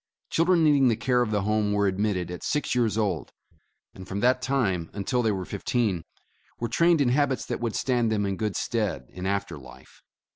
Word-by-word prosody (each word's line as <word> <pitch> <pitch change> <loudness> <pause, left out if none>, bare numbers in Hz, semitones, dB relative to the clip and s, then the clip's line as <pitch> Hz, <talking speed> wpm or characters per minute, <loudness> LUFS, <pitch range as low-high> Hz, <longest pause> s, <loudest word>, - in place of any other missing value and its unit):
Children 170 0 +3
needing 145 -4 +5
the 115 - +3
care 125 +1 +1
of 120 - 0
the 105 -2 0
Home 105 0 +1
were 100 0 +2
admitted 95 -2 -1
at 90 - -7
six 150 -2 -1
years 115 -4 +1
old, 100 -8 -1 0.6
and 95 0 -11
from 95 +2 -3
that 125 +1 +3
time 110 -11 0
until 115 +5 -1
they 110 -2 +1
were 95 -2 -3
fifteen, 100 -9 -1 0.5
were 120 - -1
trained 170 +3 +3
in 130 - +3
habits 135 -2 +1
that - - -3
would 115 -2 -2
stand 120 -4 +1
them 105 -2 0
in 100 -1 -1
good 105 0 -2
stead 105 - -2
in 90 +1 -5
after 100 -5 -2
life. 65 -1 -15
110 Hz, 205 wpm, -26 LUFS, 95-125 Hz, 0.6 s, needing